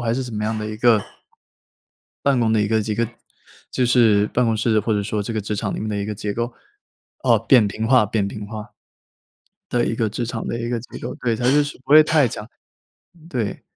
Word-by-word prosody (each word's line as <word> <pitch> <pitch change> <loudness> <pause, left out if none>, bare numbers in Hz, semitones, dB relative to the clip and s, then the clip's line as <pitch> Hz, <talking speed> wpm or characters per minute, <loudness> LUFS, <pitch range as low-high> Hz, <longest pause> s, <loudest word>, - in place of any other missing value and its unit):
还 115 -1 0
是 130 - -1
什 125 - -7
么 105 0 -3
样 110 0 -1
的 105 - -4
一 110 - -6
个 115 -1 +4 1.2
办 140 -2 +2
公 115 -2 +2
的 110 - +3
一 105 - 0
个 110 0 +2
几 105 0 -2
个 115 +1 0 0.6
就 125 - +1
是 110 -4 +4
办 125 - +1
公 115 -1 +1
室 110 0 +2
或 110 +2 -1
者 105 - +1
说 105 +1 -2
这 110 - -4
个 110 - -1
职 105 +1 -4
场 100 -1 -2
里 - - -4
面 110 - -3
的 105 - -2
一 100 - -2
个 105 +1 -4
结 105 0 -4
构， 120 +1 -2 0.7
哦， - - +4
扁 125 -6 +6
平 110 +2 -3
化 125 -3 +5
扁 105 -1 -1
平 105 0 -7
化 110 +1 -8 1.0
的 120 -1 +1
一 115 - -1
个 115 - 0
职 120 +3 -3
场 115 -1 -5
的 115 - -3
一 120 - -3
个 120 -1 -1
机 120 - -10
构， - - -5
对， 115 -2 -1
它 120 - -5
就 150 - +5
是 145 - -7
不 - - -7
会 155 +1 +10
太 155 -2 +3
讲， 110 -2 -7 0.7
嗯， 165 -2 -18
对。 120 - -3
110 Hz, 265 characters per minute, -21 LUFS, 105-120 Hz, 1.2 s, 会